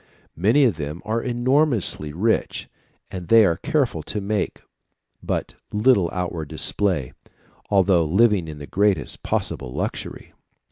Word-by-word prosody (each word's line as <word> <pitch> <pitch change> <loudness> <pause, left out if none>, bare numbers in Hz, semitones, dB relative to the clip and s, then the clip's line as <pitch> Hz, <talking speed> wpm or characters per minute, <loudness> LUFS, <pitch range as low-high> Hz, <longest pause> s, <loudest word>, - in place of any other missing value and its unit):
Many 110 - +3
of 115 -11 +2
them 75 +2 -6
are 110 +2 -1
enormously 120 - +1
rich, 105 +9 -1 0.4
but 90 -2 -6
they 115 -2 +7
are 85 -3 +1
careful 125 - 0
to 105 - -4
make 100 0 -2 0.6
but - - -3 0.2
little 105 -5 +3
outward 85 -4 -4
display, 85 -4 -1 0.6
although 95 -4 +3
living 95 +1 +3
in 75 -1 -7
the 75 - -8
greatest 95 -5 0
possible 65 -2 -2
luxury." - - -5
95 Hz, 130 wpm, -22 LUFS, 80-115 Hz, 0.6 s, they